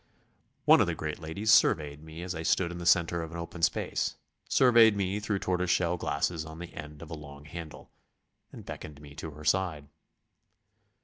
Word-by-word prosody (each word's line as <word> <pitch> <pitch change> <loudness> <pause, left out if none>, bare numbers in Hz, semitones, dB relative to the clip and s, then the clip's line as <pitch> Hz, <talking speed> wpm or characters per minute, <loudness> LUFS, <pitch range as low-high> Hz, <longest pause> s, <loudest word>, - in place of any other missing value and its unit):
One - - +7
of - - +3
the - - -1
great 75 +1 -4
ladies 90 +7 -1
surveyed 75 -5 +3
me 80 +2 -9
as 90 0 -4
I 80 - -5
stood 85 +1 +1
in 85 - -6
the 85 - -3
centre 85 -1 +3
of 80 - -5
an 85 - -6
open 85 0 -7
space, 85 - 0 0.3
surveyed 115 -5 +6
me 100 +1 -1
through 105 -1 -1
tortoise 90 -1 -1
shell 90 -1 +2
glasses 80 0 -1
on 80 0 -9
the 85 0 -8
end 75 0 -9
of 85 - -11
a - - -4
long 70 -2 -10
handle, 80 0 -9 0.6
and - - -11
beckoned 75 -2 -8
me 75 -1 -12
to 80 - -6
her 75 0 -11
side. 80 -4 0
85 Hz, 195 wpm, -29 LUFS, 75-90 Hz, 0.6 s, One